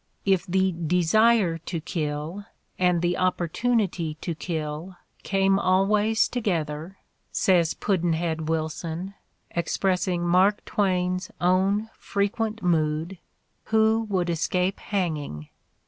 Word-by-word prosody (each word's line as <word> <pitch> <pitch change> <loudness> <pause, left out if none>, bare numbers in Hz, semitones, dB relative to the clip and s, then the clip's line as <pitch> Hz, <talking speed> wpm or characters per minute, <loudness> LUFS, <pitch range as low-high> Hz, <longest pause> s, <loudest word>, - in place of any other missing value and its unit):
"If 195 -1 +2
the 190 +1 +2
desire 180 +3 +3
to 170 +1 -4
kill 155 +4 -4 0.3
and 180 -2 +2
the 175 0 +1
op 185 0 +1
portunity 180 -4 -1
to 170 - -2
kill 160 +2 -5 0.2
came 195 0 +2
always 205 +4 +3
together," 170 -6 -2 0.3
says 175 -4 +2
Pudd'n 175 -4 0
head 160 -1 -2
Wilson, 165 +3 -3 0.4
expressing 180 +1 0
Mark 185 +4 +3
Twain's 185 -2 0
own 195 +5 +2
frequent 215 +2 -2
mood, 165 +1 0 0.5
"who 220 0 +2
would 180 -3 0
escape 180 +3 0
hanging?" 150 - -3
180 Hz, 105 wpm, -25 LUFS, 165-195 Hz, 0.5 s, desire